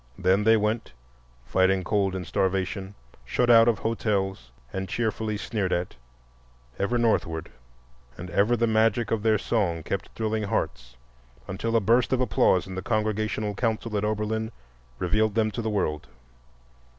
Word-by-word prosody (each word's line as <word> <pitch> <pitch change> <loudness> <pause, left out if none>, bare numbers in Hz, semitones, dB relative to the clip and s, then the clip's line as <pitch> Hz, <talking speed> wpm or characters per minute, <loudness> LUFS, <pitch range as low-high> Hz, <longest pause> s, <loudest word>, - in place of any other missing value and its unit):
Then 95 +3 +2
they 110 0 +6
went, 110 - -1 0.5
fighting 95 +3 +2
cold 95 0 0
and 90 -1 -4
starvation, 95 +1 -1 0.3
shut 120 - +2
out 115 0 +7
of 115 -3 +3
hotels, 95 - -1 0.2
and 95 -1 -4
cheerfully 110 -1 -1
sneered 100 -3 -2
at, 90 +1 -1 0.9
ever 120 +5 +1
northward; 85 -8 0 0.7
and 90 +1 -8
ever 110 +5 +3
the 115 - +2
magic 110 +1 +2
of 115 -2 +1
their 110 0 +3
song 95 -7 -1
kept 100 +4 -3
thrilling 110 -1 -1
hearts, - - -3 0.5
until 115 +5 -2
a - - +6
burst 115 +4 +2
of 130 - +2
applause 95 -6 +3
in 95 - -8
the 95 - -4
Congregational 110 -1 -1
Council 110 0 -2
at 100 - 0
Oberlin 110 +1 -1 0.5
revealed 105 - +1
them 110 -1 +2
to 115 - -4
the 110 - -2
world. 90 -8 -1
105 Hz, 150 wpm, -26 LUFS, 95-110 Hz, 0.9 s, out